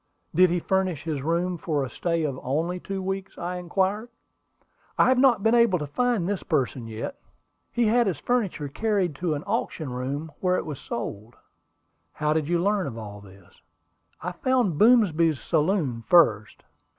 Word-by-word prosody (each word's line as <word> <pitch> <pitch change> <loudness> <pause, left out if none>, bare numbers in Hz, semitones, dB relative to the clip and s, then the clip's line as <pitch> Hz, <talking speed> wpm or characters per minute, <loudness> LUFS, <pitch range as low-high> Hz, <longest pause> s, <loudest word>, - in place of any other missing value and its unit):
"Did 180 +3 +5
he 175 +1 +1
furnish 185 -3 -1
his 155 -4 -3
room 170 +4 0
for 155 -6 -1
a - - -7
stay 170 -2 -1
of 140 -4 -2
only 165 +7 -1
two 195 +1 -5
weeks?" 195 0 -4
I 180 +1 -4
inquired. 190 +5 -1 0.9
"I - - +5
have 255 -1 +3
not 250 -6 +4
been 225 - +3
able 235 -6 +4
to 150 - -4
find 225 - 0
the 200 -2 -2
person 130 -6 -1
yet. 115 - -6 0.5
He 240 -1 +1
had 235 +1 +3
his 180 -7 -1
furniture 205 - -1
carried 195 +2 0
to 170 -2 -1
an 145 - -5
auction 190 - -3
room, 140 +5 -4
where 185 -1 +1
it - - -3
was 150 -4 -6
sold." 115 0 -6 0.8
"How 150 0 0
did 155 -2 -1
you 175 +1 +2
learn 185 - 0
all 105 -2 -8
this?" 95 -2 -18 0.6
"I 180 - -4
found 230 - 0
Boomsby's 170 - +4
saloon 155 - 0
first. 115 -12 +3
175 Hz, 170 wpm, -25 LUFS, 145-195 Hz, 0.9 s, Did